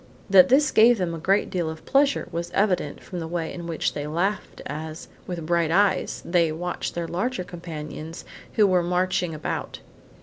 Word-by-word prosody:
That 190 Hz, -2 st, +8 dB
this 280 Hz, +3 st, +4 dB
gave 235 Hz, +2 st, +6 dB
them 180 Hz, -3 st, -1 dB
a 165 Hz, -, -5 dB
great 195 Hz, +5 st, +1 dB
deal 175 Hz, -3 st, -1 dB
of 160 Hz, 0 st, -8 dB
pleasure, 280 Hz, +1 st, +2 dB
was 170 Hz, +1 st, -3 dB
evident 185 Hz, -7 st, 0 dB
from 180 Hz, -, -6 dB
the 165 Hz, -, -4 dB
way 165 Hz, -1 st, -3 dB
in 170 Hz, -1 st, -7 dB
which 165 Hz, -2 st, -1 dB
they 145 Hz, 0 st, -4 dB
laughed 185 Hz, +6 st, -2 dB
as, 155 Hz, +2 st, -6 dB, 0.2 s
with 175 Hz, -3 st, -4 dB
bright 170 Hz, -1 st, +1 dB
eyes, 190 Hz, +2 st, +2 dB
they 170 Hz, -2 st, +2 dB
watched 175 Hz, +3 st, -4 dB
their 170 Hz, -1 st, -2 dB
larger 210 Hz, +5 st, -2 dB
companions 165 Hz, -2 st, -8 dB, 0.3 s
who 215 Hz, -, +5 dB
were 185 Hz, -2 st, +3 dB
marching 180 Hz, -1 st, 0 dB
about. 150 Hz, -, -4 dB
175 Hz, 180 wpm, -25 LUFS, 160-190 Hz, 0.3 s, That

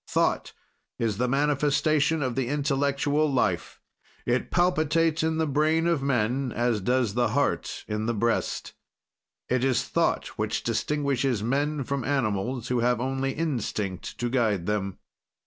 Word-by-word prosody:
"Thought -, -, 0 dB, 0.4 s
is 110 Hz, -4 st, -1 dB
the 125 Hz, +2 st, +1 dB
manifestation 145 Hz, +2 st, +2 dB
of 130 Hz, -2 st, -1 dB
the 130 Hz, 0 st, -1 dB
intellectual 145 Hz, +1 st, +1 dB
life; 130 Hz, -, 0 dB, 0.5 s
it 120 Hz, +1 st, 0 dB
palpitates 165 Hz, -2 st, +2 dB
in 160 Hz, 0 st, 0 dB
the 160 Hz, -, +1 dB
brain 155 Hz, +3 st, +2 dB
of 170 Hz, -4 st, +2 dB
men 130 Hz, 0 st, 0 dB
as 120 Hz, -3 st, 0 dB
does 125 Hz, 0 st, +1 dB
the 120 Hz, +1 st, +2 dB
heart -, -, -1 dB
in 105 Hz, +1 st, -2 dB
the 120 Hz, -, +1 dB
breast. 115 Hz, +2 st, -1 dB, 0.7 s
"It 125 Hz, 0 st, +1 dB
is 130 Hz, -3 st, +2 dB
thought -, -, 0 dB
which -, -, -1 dB
distinguishes 135 Hz, -6 st, 0 dB
men 140 Hz, +4 st, 0 dB
from 135 Hz, 0 st, -2 dB
animals, 120 Hz, -2 st, -1 dB
who 125 Hz, -1 st, +1 dB
have 120 Hz, 0 st, +2 dB
only 135 Hz, +1 st, -1 dB
instinct 110 Hz, -, -3 dB
to 120 Hz, -, -1 dB
guide 110 Hz, -8 st, +1 dB
them. 100 Hz, -2 st, -2 dB
135 Hz, 145 wpm, -26 LUFS, 120-145 Hz, 0.7 s, manifestation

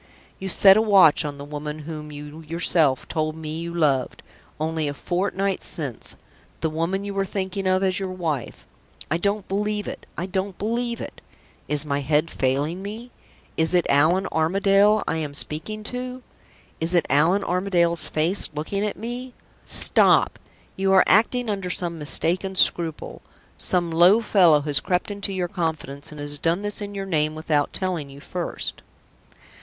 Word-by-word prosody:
You 190 Hz, -, -5 dB
set 195 Hz, +2 st, +6 dB
a -, -, +4 dB
watch 195 Hz, -8 st, +5 dB
on 145 Hz, -1 st, -5 dB
the 140 Hz, -, -8 dB
woman 150 Hz, +1 st, -6 dB
whom 150 Hz, -1 st, -7 dB
you 150 Hz, +2 st, -9 dB
yourself 160 Hz, -3 st, +1 dB
told 155 Hz, -1 st, -2 dB
me 160 Hz, 0 st, -6 dB
you 170 Hz, 0 st, -5 dB
loved, 150 Hz, -6 st, 0 dB, 0.4 s
only 160 Hz, 0 st, -1 dB
a 145 Hz, -, -4 dB
fortnight 190 Hz, +3 st, -2 dB
since 140 Hz, -8 st, -1 dB, 0.5 s
the 160 Hz, -, -1 dB
woman 170 Hz, +5 st, -2 dB
you 200 Hz, -, -4 dB
were 195 Hz, 0 st, 0 dB
thinking 195 Hz, 0 st, -3 dB
of 185 Hz, +1 st, +2 dB
as 185 Hz, 0 st, +1 dB
your 190 Hz, -1 st, -3 dB
wife! 165 Hz, -8 st, -4 dB, 0.5 s
I 170 Hz, -, +1 dB
don't 200 Hz, +2 st, -1 dB
believe 210 Hz, +1 st, -2 dB
it; -, -, -8 dB
I 180 Hz, -, -3 dB
won't 190 Hz, -1 st, -2 dB
believe 235 Hz, +3 st, -2 dB
it. -, -, -8 dB, 0.5 s
Is 150 Hz, 0 st, 0 dB
my 140 Hz, -1 st, -1 dB
head 150 Hz, +3 st, +1 dB
failing 145 Hz, +7 st, -1 dB
me? 220 Hz, +5 st, -8 dB, 0.5 s
Is 160 Hz, +2 st, +2 dB
it 175 Hz, -, +3 dB
Allan 160 Hz, +7 st, +3 dB
Armadale 195 Hz, +6 st, +3 dB
I -, -, -1 dB
am 150 Hz, -3 st, -4 dB
speaking 170 Hz, +10 st, -3 dB
to? 250 Hz, 0 st, -5 dB, 0.6 s
Is 165 Hz, +3 st, 0 dB
it 170 Hz, -, +3 dB
Allan 165 Hz, +8 st, +3 dB
Armadale's 175 Hz, -3 st, 0 dB
face 165 Hz, +6 st, +1 dB
looking 195 Hz, +7 st, -3 dB
at 210 Hz, -, -3 dB
me? 245 Hz, +2 st, -6 dB, 0.3 s
Stop! -, -, +6 dB, 0.4 s
you 195 Hz, 0 st, 0 dB
are 190 Hz, -, +7 dB
acting 235 Hz, +4 st, +3 dB
under 195 Hz, -3 st, -3 dB
some 175 Hz, -2 st, -1 dB
mistaken 175 Hz, +5 st, +2 dB
scruple. 165 Hz, -3 st, +1 dB, 0.3 s
Some 175 Hz, -2 st, 0 dB
low 175 Hz, +6 st, +6 dB
fellow 180 Hz, -9 st, +4 dB
has 145 Hz, -1 st, +1 dB
crept 180 Hz, +3 st, -1 dB
into 200 Hz, 0 st, -3 dB
your 185 Hz, -2 st, -2 dB
confidence, 160 Hz, -7 st, -4 dB
and 150 Hz, -, -10 dB
has 145 Hz, 0 st, -2 dB
done 170 Hz, +6 st, 0 dB
this 205 Hz, 0 st, -3 dB
in 205 Hz, 0 st, -6 dB
your 195 Hz, 0 st, -4 dB
name 155 Hz, -4 st, 0 dB
without 155 Hz, -2 st, 0 dB
telling 180 Hz, -7 st, -3 dB
you 140 Hz, 0 st, -12 dB
first." 175 Hz, +4 st, -5 dB
175 Hz, 170 wpm, -23 LUFS, 155-195 Hz, 0.6 s, are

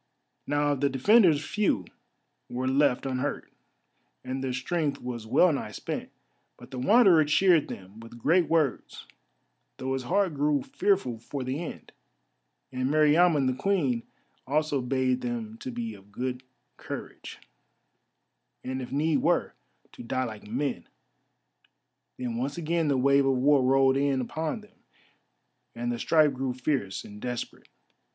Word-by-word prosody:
Now 145 Hz, 0 st, +1 dB
of 140 Hz, -2 st, -2 dB
the 140 Hz, -, +3 dB
defenders 160 Hz, -, +4 dB
few 210 Hz, +2 st, 0 dB, 0.6 s
were 125 Hz, +1 st, -3 dB
left 135 Hz, -1 st, +2 dB
unhurt, 130 Hz, +1 st, -3 dB, 0.7 s
and 130 Hz, +1 st, -4 dB
their 130 Hz, -, -1 dB
strength 145 Hz, +3 st, -2 dB
was 120 Hz, -3 st, -6 dB
well 175 Hz, +8 st, +4 dB
nigh 140 Hz, -, -4 dB
spent. -, -, -5 dB, 0.5 s
But -, -, -14 dB
the 130 Hz, -, -5 dB
Wanderer 190 Hz, -, +6 dB
cheered 170 Hz, +1 st, +4 dB
them 95 Hz, +3 st, -10 dB
with 115 Hz, +1 st, -11 dB
great 165 Hz, +7 st, +3 dB
words, 160 Hz, -6 st, 0 dB, 0.7 s
though 130 Hz, 0 st, -3 dB
his 135 Hz, -, -2 dB
heart 190 Hz, +2 st, +1 dB
grew 145 Hz, -1 st, +1 dB
fearful 185 Hz, -, 0 dB
for 130 Hz, +4 st, -5 dB
the 130 Hz, +3 st, -3 dB
end; -, -, -9 dB, 0.8 s
and 130 Hz, 0 st, -1 dB
Meriamun 155 Hz, 0 st, +4 dB
the 130 Hz, -, +1 dB
Queen 135 Hz, -6 st, 0 dB, 0.5 s
also 145 Hz, 0 st, 0 dB
bade 130 Hz, 0 st, 0 dB
them 115 Hz, -2 st, -5 dB
to -, -, -6 dB
be 115 Hz, -2 st, -4 dB
of 100 Hz, 0 st, -16 dB
good 125 Hz, +3 st, -4 dB, 0.4 s
courage, -, -, -8 dB, 1.3 s
and 130 Hz, +1 st, -4 dB
if 125 Hz, -, -7 dB
need 150 Hz, +3 st, +1 dB
were, -, -, +1 dB, 0.4 s
to -, -, -12 dB
die 130 Hz, +2 st, -2 dB
like 110 Hz, -4 st, -7 dB
men. 125 Hz, -5 st, -3 dB, 1.3 s
Then 120 Hz, -2 st, -4 dB
once 135 Hz, +5 st, -3 dB
again 165 Hz, -1 st, 0 dB
the 140 Hz, -2 st, +2 dB
wave 140 Hz, +1 st, +4 dB
of 135 Hz, -, +3 dB
War 140 Hz, +2 st, +4 dB
rolled 135 Hz, +1 st, +4 dB
in 140 Hz, -1 st, +1 dB
upon 160 Hz, -, -3 dB
them, 210 Hz, -, -21 dB, 1.0 s
and 120 Hz, +1 st, -2 dB
the 120 Hz, -, -3 dB
strife 155 Hz, -1 st, +3 dB
grew 130 Hz, -1 st, -3 dB
fierce 130 Hz, -7 st, -2 dB
and 105 Hz, 0 st, -11 dB
desperate. 125 Hz, -1 st, -5 dB
135 Hz, 145 wpm, -27 LUFS, 125-155 Hz, 1.3 s, Wanderer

